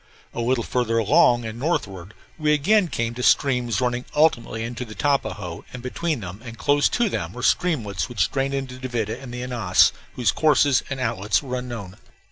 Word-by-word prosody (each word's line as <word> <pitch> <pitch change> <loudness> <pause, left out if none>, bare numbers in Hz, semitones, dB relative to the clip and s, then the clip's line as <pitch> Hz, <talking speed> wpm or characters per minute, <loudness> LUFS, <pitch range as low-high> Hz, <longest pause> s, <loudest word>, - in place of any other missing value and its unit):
A - - -3
little 120 0 +1
farther 115 -2 0
along 115 +2 +4
and 110 +1 -6
northward 100 - -3 0.2
we 150 -1 +3
again 190 +7 +3
came 115 -6 -2
to 125 - -6
streams 125 -5 +2
running 125 0 -1
ultimately 125 -7 +2
into 120 +2 -5
the 110 -3 -10
Tapajos; 100 -8 -1
and 125 -1 -8
between 150 +1 -2
them, 95 +2 -8
and 115 -2 -9
close 145 +2 +3
to 240 -1 +1
them, - - -3
were - - -7
streamlets 130 - 0
which 105 -8 0
drained 135 0 -1
into 130 -2 -5
the 130 - -4
Duvida 115 -1 -3
and 130 -3 -9
Ananas, 120 -7 +2 0.2
whose 125 -3 +2
courses 145 -4 +3
and 140 -1 -4
outlets 105 -5 0
were 130 -2 -4
unknown. 120 -7 -6
125 Hz, 185 wpm, -23 LUFS, 110-135 Hz, 0.2 s, along